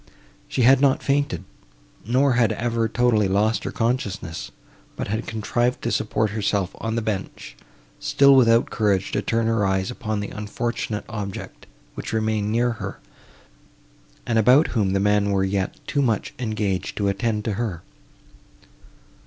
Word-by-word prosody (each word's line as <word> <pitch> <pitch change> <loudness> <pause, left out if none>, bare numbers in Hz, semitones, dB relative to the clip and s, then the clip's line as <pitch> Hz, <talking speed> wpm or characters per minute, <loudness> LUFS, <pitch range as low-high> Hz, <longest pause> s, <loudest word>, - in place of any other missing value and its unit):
She 125 - 0
had 130 +2 +6
not 140 -2 +3
fainted, 140 - 0 0.6
nor 130 +3 +3
had 120 -3 +3
ever 115 -1 -1
totally 115 -4 +2
lost 105 +2 +1
her - - -2
consciousness, 110 -8 -2 0.5
but - - -4
had 110 +3 -2
contrived 120 +3 -1
to 120 - -1
support 110 0 0
herself 100 -3 -1
on 115 0 -2
the 115 - -1
bench; 95 - -5 0.4
still 140 0 +5
without 115 -2 +4
courage 100 -4 +1
to - - 0
turn 115 0 0
her 115 -2 +1
eyes 95 +3 0
upon 110 -3 -3
the 100 - -4
unfortunate 105 0 -4
object, 105 -3 -7 0.3
which - - -6
remained 110 -1 0
near 120 +2 +2
her, - - -5 1.3
and 115 -1 +1
about 125 +8 +5
whom 100 -5 0
the 100 - +2
men 105 0 +2
were 100 -1 +1
yet 95 0 -2
too 145 - 0
much 115 -6 0
engaged 110 -5 -2
to 100 - 0
attend 105 +2 -1
to 110 - -1
her. 100 -5 -3
110 Hz, 155 wpm, -23 LUFS, 100-120 Hz, 1.3 s, had